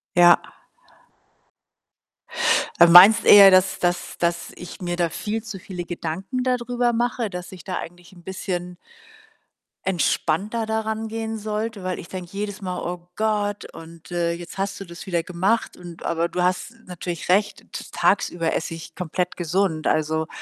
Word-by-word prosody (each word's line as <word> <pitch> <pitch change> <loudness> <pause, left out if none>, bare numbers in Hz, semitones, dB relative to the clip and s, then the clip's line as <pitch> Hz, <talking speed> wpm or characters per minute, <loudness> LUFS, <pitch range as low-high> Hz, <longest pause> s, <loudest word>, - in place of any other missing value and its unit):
Ja. 175 0 +7 2.4
Du 170 - +8
meinst 180 +6 +9
eher, 200 -1 +10
dass 185 0 +3
dass 175 0 -1
dass 170 0 -1
ich 180 - -10
mir 175 -1 -2
da 175 -1 0
viel 215 +6 -4
zu 220 -4 -7
viele 180 -1 -7
Gedanken 185 +9 -4
dadrüber 245 -1 0
mache. 235 -1 -1
Dass 180 -1 -7
ich 185 -4 -11
da 185 - -4
eigentlich 175 +1 -9
'n 175 -2 -17
bisschen 180 -1 -5 1.1
entspannter 190 +4 0
da 220 0 -1
rangehen 220 0 -4
sollte, 215 -1 -4
weil 185 0 -3
ich - - -10
denke 185 -2 -7
jedes 205 0 -4
Mal: 180 -2 -4
„Oh 175 0 -6
Gott 210 -2 -1
und, 165 +1 -13
äh, 170 -1 0
jetzt 170 +1 -9
hast 195 0 -2
du 195 - -7
das 170 +1 -10
wieder 175 -4 -1
gemacht 185 +7 -1
und“ 175 -2 -11
aber 170 0 0
du 180 +1 -2
hast 180 +5 -1
natürlich 175 -2 -6
recht, 205 +3 +2
t - - -6
tagsüber 165 -2 +1
esse 165 - -2
ich 165 0 -9
komplett 180 0 -3
gesund. 175 -2 0
Also 160 0 0
180 Hz, 160 wpm, -23 LUFS, 175-210 Hz, 2.4 s, eher